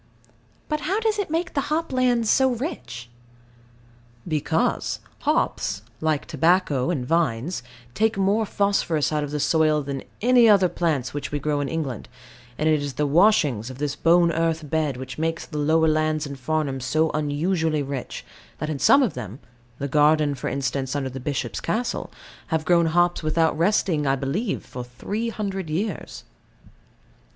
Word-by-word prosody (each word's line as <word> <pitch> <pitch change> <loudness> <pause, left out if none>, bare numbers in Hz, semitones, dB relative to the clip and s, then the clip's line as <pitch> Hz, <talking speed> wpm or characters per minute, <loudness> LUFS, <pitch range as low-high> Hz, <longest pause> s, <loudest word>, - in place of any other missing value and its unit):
But 305 - -1
how 370 +8 -1
does 440 -2 0
it 400 - -2
make 330 +3 -2
the 280 - +1
hop 320 -1 -1
lands 245 -3 +2
so 265 +4 +4
rich? 220 - -5 1.2
Because 155 -4 0 0.2
hops, 100 +1 0 0.2
like 155 -2 0
tobacco 160 -3 +2
and 140 -8 -1
vines, 160 0 0 0.3
take 220 +6 +1
more 200 +3 +2
phosphorus 195 -8 +1
out 150 -1 0
of 145 - -4
the 150 +1 -3
soil 155 0 +2
than 135 -1 -4 0.2
any 240 0 +5
other 195 -3 +5
plants 150 -9 -1
which 145 - -4
we 145 - -1
grow 145 0 -1
in 140 -1 -2
England; 145 -9 -4 0.5
and 155 - 0
it 155 -2 +3
is 140 -3 -4
the 150 - 0
washings 145 - +3
of 130 - -9
this 145 0 -2
bone 170 +2 +4
earth 165 -1 -1
bed 155 -5 0
which 130 +1 -7
make 165 +1 -1
the 150 - -6
lower 160 +2 +3
lands 155 0 +1
in 140 -1 -6
Farnham 140 0 -2
so 155 +5 +1
unusually 155 +1 0
rich, 135 -2 -6 0.3
that 155 0 -3
in 145 - -4
some 275 - +6
of 215 - 0
them 115 -4 -7 0.4
the 140 - -3
garden, 150 +1 +3
for 130 - -5
instance, 135 0 -2
under 135 -2 -1
the 135 - -6
Bishop's 130 -3 -3
castle 235 +3 -2 0.4
have 160 -1 -1
grown 170 -2 +4
hops 175 +2 +2
without 160 0 +1
resting, 165 -3 +1
I 135 - +3
believe, 155 - -2
for 125 - -7
three 205 - -4
hundred 195 -6 -4
years. 190 +8 -3
155 Hz, 165 wpm, -24 LUFS, 140-185 Hz, 1.2 s, some